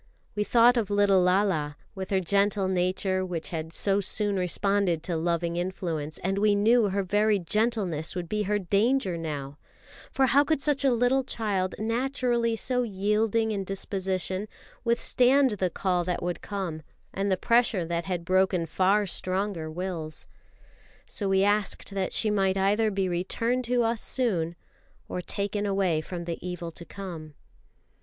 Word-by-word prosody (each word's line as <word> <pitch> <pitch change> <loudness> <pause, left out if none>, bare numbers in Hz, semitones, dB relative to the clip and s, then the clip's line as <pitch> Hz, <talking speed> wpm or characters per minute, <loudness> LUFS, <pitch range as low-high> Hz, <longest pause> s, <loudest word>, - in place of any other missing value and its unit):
We 210 - 0
thought 240 +3 +5
of 215 -4 0
little 205 -2 +4
Lala, 180 -6 +1 0.2
with 190 -1 -6
her 195 - +2
gentle 200 +2 +1
nature 185 +1 0
which 175 -3 -4
had 160 -1 -5
so 195 +4 +1
soon 205 +1 -1
responded 185 -2 +1
to 170 0 -2
loving 170 +1 -1
influence, 170 -4 -3
and 195 +2 0
we 210 0 +3
knew 220 +1 +4
her 200 +1 -1
very 210 +3 +2
gentleness 195 -4 -1
would 175 -2 -4
be 210 +4 -1
her 210 - +2
danger 200 +2 +1
now; 145 -3 -5 0.5
for 270 - +3
how 275 +3 +4
could 315 -1 0
such 285 -1 +1
a 270 - +4
little 245 +3 +2
child, 200 -7 -2
naturally 235 0 0
so 250 +2 0
yielding 220 +1 0
in 200 -2 -2
disposition, 190 0 -3 0.4
withstand 250 +3 +3
the 190 -3 -1
call 180 0 0
that 180 -1 -2
would 175 0 -3
come, 185 -6 -4 0.3
and 195 +1 -1
the 190 - +2
pressure 230 -5 +2
that 170 0 -2
had 175 -2 -3
broken 185 -1 +2
far 195 +5 +2
stronger 185 -2 -2
wills? 160 -2 -5 0.8
So 200 -2 -3
we 190 0 +3
asked 205 0 0
that 195 -2 -2
she 215 - +1
might 195 -2 +1
either 205 +3 +2
be 195 -2 -1
returned 230 +8 -1
to 245 0 +2
us 230 -1 0
soon 175 -10 0 0.5
or 180 - -4
taken 205 +2 -2
away 190 -5 +1
from 170 +1 -6
the 170 -1 -5
evil 180 -2 -5
to 170 - -10
come. 170 -7 -8
195 Hz, 160 wpm, -27 LUFS, 180-215 Hz, 0.8 s, thought